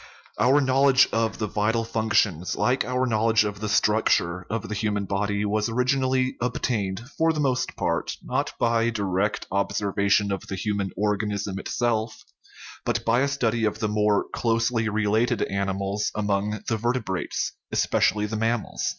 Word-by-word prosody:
Our 135 Hz, +4 st, +4 dB
knowledge 135 Hz, 0 st, +4 dB
of 115 Hz, 0 st, 0 dB
the 110 Hz, -, -1 dB
vital 110 Hz, +2 st, 0 dB
functions, 105 Hz, -6 st, 0 dB
like 130 Hz, +2 st, +1 dB
our 125 Hz, +1 st, 0 dB
knowl 115 Hz, -2 st, +1 dB
edge 110 Hz, -2 st, +4 dB
of 105 Hz, -1 st, -4 dB
the 105 Hz, 0 st, -3 dB
structure 90 Hz, -5 st, +2 dB
of 115 Hz, 0 st, -3 dB
the -, -, -4 dB
human 105 Hz, -1 st, -1 dB
body, 100 Hz, +1 st, -1 dB
was 105 Hz, +2 st, 0 dB
originally 130 Hz, +1 st, +1 dB
obtained, 110 Hz, -5 st, -1 dB, 0.2 s
for 165 Hz, 0 st, +4 dB
the 155 Hz, -, -3 dB
most 130 Hz, -3 st, 0 dB
part, -, -, -2 dB
not -, -, -1 dB
by 115 Hz, 0 st, +2 dB
direct 100 Hz, -2 st, -1 dB
observation 100 Hz, +1 st, +1 dB
of 95 Hz, -, -4 dB
the 95 Hz, -, -4 dB
human 100 Hz, 0 st, -2 dB
organism 105 Hz, -1 st, -1 dB
itself, 110 Hz, 0 st, -2 dB, 0.6 s
but -, -, -1 dB
by 115 Hz, +2 st, +3 dB
a 140 Hz, -, +2 dB
study 120 Hz, -5 st, 0 dB
of 110 Hz, -, 0 dB
the 110 Hz, -, -1 dB
more 105 Hz, -1 st, +2 dB
closely 115 Hz, -1 st, +1 dB
related 110 Hz, +2 st, +1 dB
animals 100 Hz, +1 st, -2 dB
among 105 Hz, 0 st, -1 dB
the 110 Hz, -, 0 dB
vertebrates, 115 Hz, -5 st, -2 dB, 0.2 s
espe -, -, +1 dB
cially 105 Hz, 0 st, -2 dB
the 110 Hz, +1 st, -3 dB
mammals. 115 Hz, 0 st, -1 dB
110 Hz, 160 wpm, -25 LUFS, 100-120 Hz, 0.6 s, Our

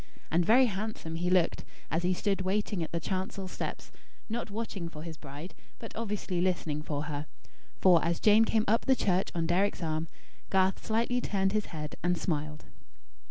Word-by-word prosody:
And 170 Hz, +2 st, +4 dB
very 245 Hz, +8 st, +6 dB
handsome 210 Hz, -6 st, -3 dB
he 175 Hz, +1 st, 0 dB
looked, 180 Hz, -2 st, +2 dB, 0.3 s
as 165 Hz, -, +1 dB
he 180 Hz, +1 st, +1 dB
stood 195 Hz, 0 st, 0 dB
waiting 195 Hz, 0 st, 0 dB
at 160 Hz, -, -3 dB
the 170 Hz, -, -1 dB
chancel 190 Hz, +2 st, -3 dB
steps; -, -, -5 dB, 0.4 s
not 230 Hz, 0 st, -3 dB
watching 205 Hz, -5 st, -4 dB
for 155 Hz, -2 st, -9 dB
his 165 Hz, -1 st, -6 dB
bride; 145 Hz, +4 st, -9 dB, 0.2 s
but 225 Hz, -, -9 dB
obviously 205 Hz, -5 st, -2 dB
listening 170 Hz, -5 st, 0 dB
for 150 Hz, -1 st, -3 dB
her; 150 Hz, 0 st, -4 dB, 0.5 s
for, 180 Hz, -3 st, +5 dB
as 170 Hz, 0 st, 0 dB
Jane 215 Hz, +1 st, +6 dB
came 220 Hz, -1 st, +2 dB
up 225 Hz, +3 st, +2 dB
the 265 Hz, -, +5 dB
church 190 Hz, -5 st, +1 dB
on 165 Hz, -1 st, +1 dB
Deryck's 185 Hz, +2 st, +1 dB
arm, 160 Hz, 0 st, -1 dB, 0.4 s
Garth 190 Hz, 0 st, +2 dB
slightly 235 Hz, +3 st, +1 dB
turned 195 Hz, -3 st, +1 dB
his 215 Hz, 0 st, 0 dB
head 150 Hz, -2 st, -6 dB
and 175 Hz, 0 st, +2 dB
smiled. 150 Hz, -3 st, -2 dB
185 Hz, 180 wpm, -30 LUFS, 165-210 Hz, 0.5 s, very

